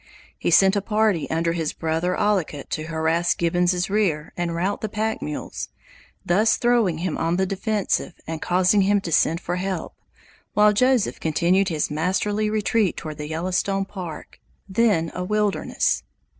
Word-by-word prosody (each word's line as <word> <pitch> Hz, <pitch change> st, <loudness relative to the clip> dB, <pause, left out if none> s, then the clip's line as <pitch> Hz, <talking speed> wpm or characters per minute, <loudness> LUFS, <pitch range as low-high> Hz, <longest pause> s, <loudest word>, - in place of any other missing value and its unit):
He -, -, 0 dB
sent 195 Hz, +1 st, +5 dB
a 200 Hz, -, +1 dB
party 210 Hz, -4 st, +1 dB
under 165 Hz, +1 st, 0 dB
his 165 Hz, -3 st, -2 dB
brother 165 Hz, +3 st, -1 dB
Ollicut 190 Hz, -9 st, -1 dB
to 155 Hz, -, -2 dB
harass 165 Hz, +1 st, +1 dB
Gibbons' 175 Hz, +1 st, +1 dB
rear 190 Hz, -7 st, 0 dB
and 175 Hz, -1 st, -2 dB
rout 185 Hz, +4 st, -1 dB
the 215 Hz, -, -3 dB
pack 220 Hz, +2 st, -2 dB
mules, 150 Hz, -, -5 dB, 0.6 s
thus 215 Hz, +5 st, +3 dB
throwing 235 Hz, -8 st, +2 dB
him 170 Hz, -1 st, -3 dB
on 165 Hz, +1 st, +1 dB
the 190 Hz, -, +2 dB
defensive 195 Hz, -2 st, -1 dB
and 160 Hz, 0 st, -5 dB
causing 185 Hz, +3 st, +3 dB
him 200 Hz, +1 st, +3 dB
to 170 Hz, -, -5 dB
send 165 Hz, +1 st, +3 dB
for 175 Hz, +1 st, -3 dB
help, 185 Hz, -2 st, -3 dB, 0.6 s
while 210 Hz, 0 st, +5 dB
Joseph 255 Hz, 0 st, +2 dB
continued 175 Hz, +5 st, +2 dB
his 155 Hz, -3 st, -1 dB
masterly 200 Hz, +7 st, 0 dB
retreat 215 Hz, -1 st, +1 dB
toward 155 Hz, -1 st, -7 dB
the 150 Hz, 0 st, -5 dB
Yellowstone 185 Hz, +4 st, -1 dB
Park, 180 Hz, -6 st, -8 dB, 0.3 s
then 195 Hz, -5 st, +2 dB
a 180 Hz, -, -3 dB
wilderness. 210 Hz, +1 st, 0 dB
185 Hz, 155 wpm, -23 LUFS, 165-205 Hz, 0.6 s, sent